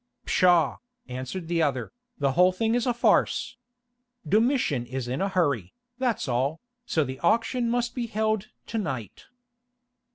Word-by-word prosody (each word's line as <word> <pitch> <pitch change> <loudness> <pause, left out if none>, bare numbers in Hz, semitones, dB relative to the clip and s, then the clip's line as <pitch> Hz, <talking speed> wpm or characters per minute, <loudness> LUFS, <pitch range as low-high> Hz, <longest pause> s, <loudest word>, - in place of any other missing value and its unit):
"Pshaw," 175 -5 +4 0.3
answered 130 +7 -5
the 170 0 +1
other, 135 -5 0 0.3
"the 140 -2 +1
whole 180 +5 +5
thing 220 +5 0
is 245 +1 +1
a 245 - +3
farce. 240 - +2 0.7
Domitian 215 - +2
is 130 0 -4
in 130 +8 -2
a 195 - +1
hurry, 145 - 0 0.2
that's 245 - 0
all, 135 +5 0 0.3
so 160 - +2
the 130 -1 -6
auction 230 +6 +1
must 240 0 0
be 240 -2 -3
held 215 -1 0 0.2
to 225 - -3
night." 130 - -5
175 Hz, 150 wpm, -26 LUFS, -, 0.7 s, whole